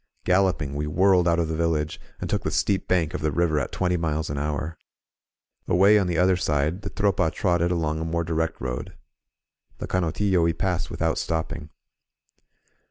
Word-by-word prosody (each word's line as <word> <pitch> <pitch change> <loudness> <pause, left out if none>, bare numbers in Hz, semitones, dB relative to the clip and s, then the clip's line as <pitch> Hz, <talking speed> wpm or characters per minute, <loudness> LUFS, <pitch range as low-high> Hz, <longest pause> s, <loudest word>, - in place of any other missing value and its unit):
Galloping, 90 -6 +2
we 75 +1 -2
whirled 90 +2 +3
out 85 0 +3
of 85 -1 +1
the 80 - -2
village, 80 -2 -1 0.2
and - - -4
took - - -1
the - - -2
steep 100 -2 0
bank 85 -4 +1
of - - -3
the 75 - 0
river 80 0 +1
at - - -3
twenty 90 -1 0
miles 80 -2 -2
an 70 - -3
hour. 75 +2 -3 0.9
Away 100 +4 +5
on 95 - 0
the 85 -1 -1
other 90 +2 +4
side, 75 +1 0
the 100 - -5
Tropa 100 -5 +1
trotted 85 -2 +1
along 80 -3 -1
a - - -2
more 85 +1 -1
direct 80 0 -2
road. 60 -1 -5 0.8
The - - -5
Canotillo 90 +1 +1
we 85 0 +2
passed 90 0 -2
without 80 0 -1
stopping. 80 -1 -3
85 Hz, 180 wpm, -25 LUFS, 80-90 Hz, 0.9 s, Away